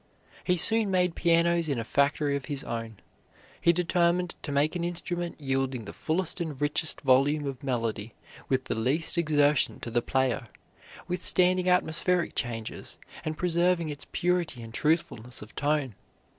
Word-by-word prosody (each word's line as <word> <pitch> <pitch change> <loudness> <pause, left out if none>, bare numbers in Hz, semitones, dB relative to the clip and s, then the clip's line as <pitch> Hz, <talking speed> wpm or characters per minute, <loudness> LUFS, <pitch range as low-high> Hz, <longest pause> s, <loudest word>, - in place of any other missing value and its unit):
He 180 -1 +1
soon 220 +4 +4
made 180 -2 +1
pianos 170 -1 +2
in 140 - 0
a 115 - -2
factory 140 +3 +1
of 140 - -4
his 145 -3 -3
own. 115 -2 -5 0.6
He 170 - +5
determined 175 0 +1
to 145 - -5
make 145 +4 +1
an 175 - -2
instrument 175 0 -4
yielding 135 -4 -2
the - - -8
fullest 170 +2 -1
and 155 -5 -4
richest 145 +1 0
volume 140 +3 +3
of 135 -2 -5
melody 115 -4 -3 0.3
with 130 -1 +1
the - - -2
least 130 +9 0
exertion 150 -4 +2
to 120 - -5
the 120 +1 +1
player, 130 -1 0 0.6
withstanding 180 0 +4
atmospheric 180 0 +1
changes, 115 -2 -4 0.3
and 155 0 -4
preserving 175 -1 +1
its 145 -1 -8
purity 175 -8 -1
and 115 0 -10
truthfulness 125 -8 -1
of 105 - -14
tone. 145 -4 -1
150 Hz, 155 wpm, -27 LUFS, 130-175 Hz, 0.6 s, He